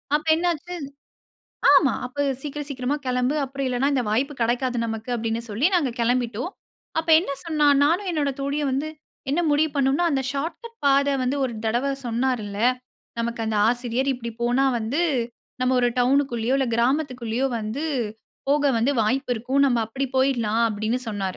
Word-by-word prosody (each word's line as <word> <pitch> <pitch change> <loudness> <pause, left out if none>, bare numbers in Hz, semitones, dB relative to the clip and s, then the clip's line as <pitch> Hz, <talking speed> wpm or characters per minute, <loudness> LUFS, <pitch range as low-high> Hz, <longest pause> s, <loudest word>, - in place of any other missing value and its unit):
அப்ப 300 - -1
என்ன 340 +2 -2
ஆச்சு 350 +3 -6 1.0
ஆமா 295 -10 +5
அப்ப 285 +3 -2 0.2
சீக்கிரம் 295 0 -5
சீக்கிரமா 265 +1 -1
கிளம்பு, 250 +3 +1
அப்புறம் 275 +1 -4
இல்லைன்னா 255 +3 +1
இந்த 255 -3 +1
வாய்ப்பு 265 +7 0
கிடைக்காது 245 +2 0
நமக்கு 225 +1 -5
அப்படின்னு 225 0 -2
சொல்லி 230 - +2
நாங்க 295 -7 +2
கிளம்பிட்டோம். 245 - 0 0.5
அப்ப 325 +1 -4
என்ன 330 -4 -4
சொன்னா, 305 -3 +2 0.2
நானும் 355 +6 +2
என்னுடைய 290 -4 -1
தோழியும் 285 +1 -1
வந்து 280 +4 -1 0.4
என்ன 290 +5 +1
முடிவு 310 +2 +3
பண்ணோம்னா, 275 +5 +2
அந்த 270 -2 +1
ஷார்ட்கட் 345 - -5
பாதை 280 0 +4
வந்து 265 +3 0
ஒரு 250 -3 -1
தடவை 240 +5 +1
சொன்னாருல்ல, 230 -4 -1 0.6
"நமக்கு 235 0 -2
அந்த 220 - -1
ஆசிரியர், 245 +2 -1
இப்படி 235 -2 -6
போனா 245 +3 +2
வந்து 240 +9 -1 0.6
நாம் 255 0 +2
ஒரு 245 - +3
டவுன் 260 +3 +4
குள்ளேயோ 235 +2 0
இல்லை 265 -2 +1
கிராமத்துக்குள்ளேயோ 250 -1 0
வந்து 220 +8 -4 0.7
போக 285 -1 +3
வந்து 235 +5 +2
வாய்ப்பு 250 +4 0
இருக்கும். 255 +5 0
நாம் 240 -3 +2
அப்படி 270 +4 -3
போய்டலாம்," 235 -4 +2
அப்படின்னு 215 +3 -1
சொன்னாரு. 205 -2 -4
260 Hz, 160 wpm, -24 LUFS, 235-285 Hz, 1.0 s, ஆமா